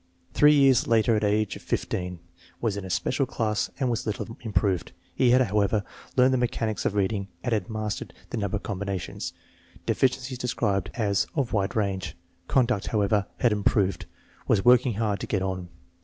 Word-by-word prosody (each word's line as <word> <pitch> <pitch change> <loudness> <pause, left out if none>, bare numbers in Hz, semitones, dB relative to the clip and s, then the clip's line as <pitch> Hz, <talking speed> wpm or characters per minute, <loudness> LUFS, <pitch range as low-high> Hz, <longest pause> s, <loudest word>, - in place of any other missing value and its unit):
Three 150 0 +6
years 135 -3 +5
later, 115 0 +3
at 105 - 0
age 105 0 +1
of - - -10
15, 90 -1 -2 0.4
was 110 -4 0
in 100 - -5
a 95 - -7
special 130 +8 0
class 110 -4 -1
and 130 - +1
was 115 -2 -1
little 105 - -2
if - - -11
any - - -10
improved. 95 -3 0 0.2
He 125 - +3
had, 125 +2 +5
however, 105 -2 +1 0.3
learned 130 +1 +5
the 130 - +2
mechanics 115 -3 -1
of 105 - 0
reading 100 0 0 0.2
and 125 - 0
had 105 -4 -1
mastered 110 -1 -4 0.2
the - - -2
number 100 -1 -1
combinations. 100 -2 -4 0.5
Deficiencies 130 -1 0
described 100 -6 0
as 105 -4 +1
"of 135 -6 -1
wide 100 -2 0
range/' 100 -3 -1 0.3
Conduct, 125 -6 +2
however, 105 -1 +1
had 120 - +3
improved. 100 -2 +1 0.4
Was 105 0 +2
"working 125 -1 +5
hard 105 -2 0
to - - -5
get 100 -3 0
on." 95 -2 -3
105 Hz, 180 wpm, -26 LUFS, 100-120 Hz, 0.5 s, Three